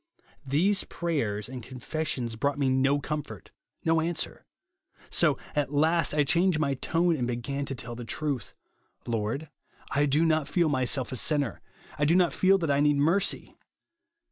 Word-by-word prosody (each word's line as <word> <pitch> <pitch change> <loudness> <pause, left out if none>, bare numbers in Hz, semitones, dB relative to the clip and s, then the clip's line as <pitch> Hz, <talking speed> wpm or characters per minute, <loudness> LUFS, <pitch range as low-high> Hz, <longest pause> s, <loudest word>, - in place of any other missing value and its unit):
These 185 +9 +2
prayers 115 -12 -2
and 130 0 -7
con 130 +3 -10
fessions 125 -4 -3
broug 140 +5 0
ht - - -13
irje 130 - +2
no 140 +2 +3
comfort, 150 +1 -5 0.3
no 165 0 +3
answer; 165 0 -3 0.6
so - - +3 0.2
at 145 -2 0
last 160 +2 +2
I 150 - +4
changed 175 +3 +2
my 145 -3 +1
tone, 165 +5 +1
and 125 -5 -1
began 130 +4 -3
to 135 - -4
tell 120 -1 -7
the 120 +1 -7
truth 135 -1 -3 0.2
— - - -43
■ - - -22
Lord, 115 +8 -2 0.4
I 145 +1 +2
do 150 +4 +3
not 155 -2 +2
feel 170 -3 +2
myself 130 -1 0
a - - -3
sinner; 140 +2 0 0.4
I 145 - +3
do 165 +4 +4
not 180 -2 +3
feel 195 +1 +4
that 165 -6 -1
I 140 - +2
need 145 0 +3
mercy. 170 +8 +1
145 Hz, 180 wpm, -28 LUFS, 130-165 Hz, 0.6 s, I